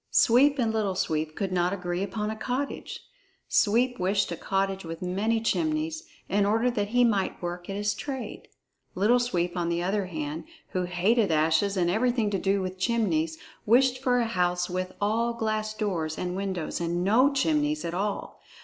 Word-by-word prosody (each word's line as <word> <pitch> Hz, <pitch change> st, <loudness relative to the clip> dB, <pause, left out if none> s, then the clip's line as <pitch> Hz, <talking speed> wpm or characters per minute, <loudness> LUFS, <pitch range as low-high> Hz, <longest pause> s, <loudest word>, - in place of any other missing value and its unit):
Sweep 275 Hz, +5 st, +5 dB
and 230 Hz, -4 st, +1 dB
Little 205 Hz, -4 st, 0 dB
Sweep 155 Hz, -3 st, -1 dB
could 195 Hz, -2 st, -2 dB
not 180 Hz, 0 st, +1 dB
agree 180 Hz, -2 st, -3 dB
upon 210 Hz, +2 st, -2 dB
a -, -, -4 dB
cottage. 255 Hz, +5 st, -4 dB, 0.5 s
Sweep 240 Hz, +3 st, +2 dB
wished 195 Hz, +1 st, +1 dB
a -, -, -2 dB
cottage 195 Hz, +2 st, -1 dB
with 165 Hz, +1 st, -7 dB
many 205 Hz, +5 st, 0 dB
chimneys, 160 Hz, -6 st, -1 dB, 0.2 s
in 200 Hz, +1 st, +2 dB
order 225 Hz, +5 st, +2 dB
that 205 Hz, -4 st, -1 dB
he 245 Hz, +3 st, +3 dB
might 205 Hz, -5 st, +1 dB
work 175 Hz, +1 st, -5 dB
at 195 Hz, -, -3 dB
his 205 Hz, 0 st, 0 dB
trade. 265 Hz, -3 st, -6 dB, 0.5 s
Little 220 Hz, +6 st, +4 dB
Sweep, 180 Hz, -8 st, -1 dB
on 170 Hz, -1 st, -1 dB
the 170 Hz, 0 st, -1 dB
other 195 Hz, +1 st, 0 dB
hand, 155 Hz, -2 st, -5 dB, 0.2 s
who 185 Hz, -1 st, -1 dB
hated 195 Hz, +5 st, +2 dB
ashes 160 Hz, +5 st, +2 dB
and 175 Hz, -2 st, +2 dB
everything 230 Hz, 0 st, +1 dB
to 195 Hz, -, 0 dB
do 195 Hz, +1 st, +1 dB
with 185 Hz, 0 st, -5 dB
chimneys, 175 Hz, -8 st, 0 dB, 0.3 s
wished 255 Hz, +3 st, +4 dB
for 250 Hz, -2 st, +2 dB
a 235 Hz, -, +1 dB
house 180 Hz, -4 st, 0 dB
with 185 Hz, 0 st, -2 dB
all 230 Hz, +3 st, 0 dB
glass 215 Hz, -1 st, -1 dB
doors 175 Hz, -7 st, -2 dB
and 180 Hz, 0 st, -3 dB
windows 190 Hz, -4 st, -3 dB
and 170 Hz, +1 st, -1 dB
no 240 Hz, +9 st, +4 dB
chimneys 300 Hz, +2 st, +1 dB
at 170 Hz, -, -3 dB
all! 200 Hz, +3 st, -3 dB
195 Hz, 180 wpm, -27 LUFS, 175-230 Hz, 0.5 s, Sweep